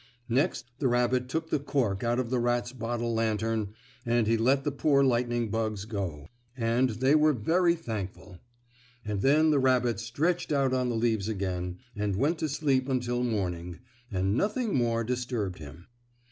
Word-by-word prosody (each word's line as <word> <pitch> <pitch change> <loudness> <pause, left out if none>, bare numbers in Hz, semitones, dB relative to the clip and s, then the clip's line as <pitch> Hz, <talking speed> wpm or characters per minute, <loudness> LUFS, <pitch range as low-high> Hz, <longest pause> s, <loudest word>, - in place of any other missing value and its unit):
Next 135 +3 +1
the 135 - +2
rabbit 125 +1 +1
took 160 +3 -3
the 150 - +2
cork 125 -9 -1
out 120 +1 +1
of 125 -2 -2
the 130 - +1
rat's 120 0 0
bottle 120 -1 -2
lantern 110 -1 -1 0.3
and 120 -2 +2
he 115 +2 +3
let 130 +5 +2
the 145 - 0
poor 140 0 +3
lightning 120 -3 +1
bugs 110 -2 -2
go, 95 -10 -4 0.3
and 120 +2 +2
they 130 +5 +2
were 155 0 +5
very 170 - +2
thankful. 105 - -6 0.7
And 105 -2 -2
then 155 +5 +4
the 145 - +3
rabbit 125 -4 +2
stretched 145 +10 -1
out 135 -3 +2
on 125 -1 +1
the 120 - -1
leaves 110 -3 0
again, 90 -3 -3 0.2
and 105 -1 -1
went 150 - +1
to 155 - -1
sleep 135 -2 +1
until 120 -2 0
morning 90 -7 -2 0.3
and 95 0 0
nothing 215 - 0
more 115 -2 +1
disturbed 120 -6 -3
him. 80 +3 -11
120 Hz, 170 wpm, -28 LUFS, 110-135 Hz, 0.7 s, were